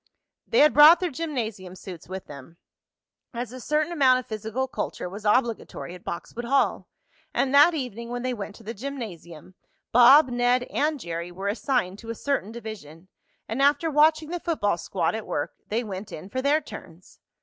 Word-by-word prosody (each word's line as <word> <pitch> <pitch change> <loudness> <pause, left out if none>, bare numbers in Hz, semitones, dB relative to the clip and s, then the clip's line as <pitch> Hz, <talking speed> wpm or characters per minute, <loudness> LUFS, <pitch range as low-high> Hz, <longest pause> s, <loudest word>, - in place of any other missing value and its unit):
They 465 - +3
had 300 0 +6
brought 305 +4 +9
their 360 -3 -2
gymnasium 225 - -4
suits 180 -4 -10
with 190 0 -6
them, 145 +3 -12 0.8
as 240 0 -4
a 255 - -8
certain 300 +6 0
amount 265 -6 +4
of 255 - -5
physical 220 +4 -3
culture 255 - -4
was 200 +4 -9
obligatory 225 -5 0
at 180 - -12
Boxwood 235 +7 -6
Hall; 275 +3 +1 0.5
and 270 0 +1
that 295 +4 +7
evening, 235 -5 -5
when 245 0 -4
they 255 0 -1
went 210 -2 -7
to 230 - -15
the 225 +2 -5
gymnasium, 200 - -8 0.4
Bob, 260 +4 +7
Ned 245 +1 +2
and 300 0 0
Jerry 170 -3 -5
were 195 +3 -4
assigned 210 -3 -1
to 230 - -11
a 230 - -3
certain 270 -5 -2
division, 190 -7 -10 0.4
and 225 +5 -2
after 290 +3 +3
watching 310 +1 +3
the 350 - -3
football 205 - -1
squad 165 +1 -1
at 220 -1 -5
work, - - -3
they 230 +3 -1
went 195 -2 -7
in 180 +5 -8
for 260 +5 -3
their 290 +3 +2
turns. 175 - -12
235 Hz, 185 wpm, -25 LUFS, 195-280 Hz, 0.8 s, brought